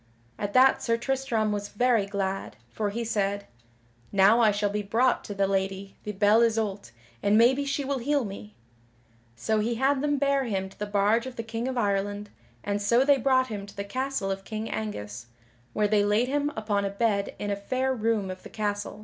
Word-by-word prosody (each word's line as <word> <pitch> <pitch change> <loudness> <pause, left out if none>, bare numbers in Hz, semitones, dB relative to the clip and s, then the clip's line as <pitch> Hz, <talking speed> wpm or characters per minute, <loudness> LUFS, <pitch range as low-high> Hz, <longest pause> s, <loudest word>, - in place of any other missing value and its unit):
At 205 0 -3
that 260 +1 +5
Sir 230 -1 +1
Tristram 240 -4 -1
was 205 0 -3
very 230 -2 +2
glad, 195 - -3 0.2
for 210 -2 -2
he 230 +3 -3
said: 200 -2 -1 0.7
"Now 200 +4 +5
I 225 -2 +5
shall 205 0 0
be 210 0 -1
brought 230 +5 +1
to 205 - -6
the 195 0 +2
Lady 195 0 -2
the 210 - -2
Belle 210 +3 +4
Isoult 220 - 0 0.3
and 205 +1 +3
maybe 260 +5 +4
she 280 0 -2
will 275 -1 -1
heal 280 +1 0
me." 205 +1 -9 0.8
So 215 - 0
he 230 +3 0
had 265 +3 +1
them 290 0 +1
bare 275 -1 +1
him 190 -4 -2
to 195 - -20
the 210 - -3
barge 210 +4 +2
of 255 - -8
the 230 - -4
King 225 +2 -4
of 260 -1 -3
Ireland, 205 -1 -1 0.3
and 205 0 -2
so 235 +6 +3
they 285 -1 +5
brought 260 0 +2
him 205 -2 -5
to 200 - -13
the 200 - -2
castle 255 -2 -2
of 195 0 -4
King 215 +1 -5
Angus, 120 - -5 0.5
where 210 0 +2
they 205 -1 +3
laid 210 +4 +2
him 290 +1 0
upon 210 -2 -1
a 200 - -1
bed 200 -1 0
in 205 - -3
a - - +1
fair 255 +6 -1
room 220 -5 0
of 185 - -9
the - - -11
castle. 205 -1 -3
215 Hz, 210 wpm, -27 LUFS, 200-245 Hz, 0.8 s, that